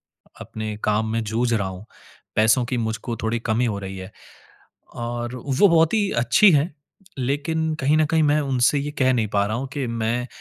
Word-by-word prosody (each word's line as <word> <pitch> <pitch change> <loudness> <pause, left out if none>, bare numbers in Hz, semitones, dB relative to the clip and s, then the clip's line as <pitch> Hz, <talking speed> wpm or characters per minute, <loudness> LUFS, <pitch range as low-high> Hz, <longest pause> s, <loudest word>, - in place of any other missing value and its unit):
अपने 110 -1 -8
काम 105 +1 +1
में 115 0 0
जूझ 115 +3 -1
रहा 100 -4 0
हूँ। 95 +1 -9 0.5
पैसों 110 +3 +4
की 125 +1 -3
मुझको 115 +1 -3
थोड़ी 115 +1 0
कमी 115 +2 0
हो 105 -3 -2
रही 95 0 -7
है। 95 +2 -9 0.8
और 120 +1 -4
वो 135 - +2
बहुत 165 -2 +3
ही 210 -3 +2
अच्छी 120 - +5
हैं, 150 +2 +2 0.5
लेकिन 155 +5 -1
कहीं 145 +3 +3
न 155 - +3
कहीं 160 +1 +2
मैं 150 0 +3
उनसे 135 0 +2
ये 145 +1 -4
कह 130 -1 +3
नहीं 115 -3 0
पा 100 0 +2
रहा 110 +2 -2
हूँ 135 +2 -4
कि 140 -3 -2
मैं 115 +1 -2
120 Hz, 195 wpm, -22 LUFS, 110-145 Hz, 0.8 s, अच्छी